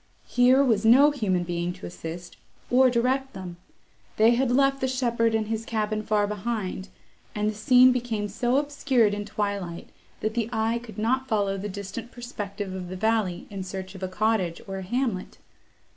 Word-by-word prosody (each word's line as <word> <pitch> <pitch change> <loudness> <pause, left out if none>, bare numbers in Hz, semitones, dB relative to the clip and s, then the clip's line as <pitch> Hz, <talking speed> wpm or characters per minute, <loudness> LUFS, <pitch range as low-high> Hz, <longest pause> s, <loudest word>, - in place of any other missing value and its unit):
Here 250 +2 +4
was 225 -6 +2
no 265 +6 +7
human 195 -10 0
being 175 0 -2
to 185 - -10
assist, 170 0 -8 0.4
or 255 +1 +6
direct 260 +3 0
them; 185 -2 -8 0.6
they 220 +2 +6
had 245 +1 +2
left 275 +2 +2
the 260 - +1
shepherd 235 -3 +1
and 220 -1 0
his 225 0 -2
cabin 215 -1 -2
far 210 -1 +1
behind, 205 -2 -4 0.5
and 210 0 0
the 215 - 0
scene 250 +4 +6
became 235 -4 -2
so 240 +6 0
obscured 275 -6 +2
in 205 0 -3
twilight, 200 -4 -4 0.3
that 215 - -1
the 230 -1 -1
eye 225 +1 0
could 225 -2 -11
not 260 +5 0
follow 205 -4 0
the 200 +2 -4
distant 200 +4 -7
perspective 205 -6 -6
of 185 -1 -5
the 185 - -5
valley 215 -4 0
in 195 -1 -5
search 190 0 -6
of 190 - -11
a 185 - -2
cottage, 185 -3 0
or 195 0 -4
a - - -5
hamlet. 225 -1 -2
215 Hz, 180 wpm, -26 LUFS, 195-245 Hz, 0.6 s, no